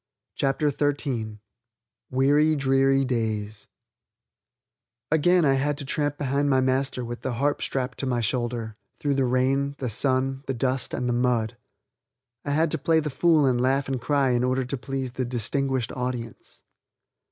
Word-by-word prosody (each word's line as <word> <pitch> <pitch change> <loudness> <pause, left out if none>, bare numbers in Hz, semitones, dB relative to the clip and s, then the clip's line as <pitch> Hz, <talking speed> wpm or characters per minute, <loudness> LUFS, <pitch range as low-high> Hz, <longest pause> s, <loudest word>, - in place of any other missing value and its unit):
CHAPTER 145 +2 0
XIII 135 -7 -2 0.7
WEARY 145 +4 +3
DREARY 135 0 +2
DAYS 110 -4 -3 1.4
Again 170 +2 +4
I 135 - +4
had 145 +2 0
to 145 - -6
tramp 145 +1 -1
behind 140 0 0
my 130 -1 +3
master 130 -1 0
with 120 +1 -6
the 130 - -3
harp 145 +4 0
strapped 125 -1 -2
to 135 - -2
my 125 -2 0
shoulder, 115 -1 -2 0.2
through 145 -1 0
the 135 -1 +1
rain, 135 +3 +1
the 125 - -3
sun, 135 +3 +1
the 135 - -1
dust, 130 +1 0
and 125 - -2
the 120 - +1
mud. 120 -3 0 0.9
I - - -5
had 155 +2 +2
to 160 - -1
play 160 +3 +3
the 150 -1 -3
fool 155 +2 +3
and 125 -2 +2
laugh 135 +2 +1
and 130 -2 -2
cry 135 0 +2
in 120 0 +1
order 130 +1 0
to 125 - -3
please 135 0 -4
the 130 +1 -3
"distinguished 125 +1 -1
audience." 120 - -6
130 Hz, 165 wpm, -25 LUFS, 125-140 Hz, 1.4 s, Again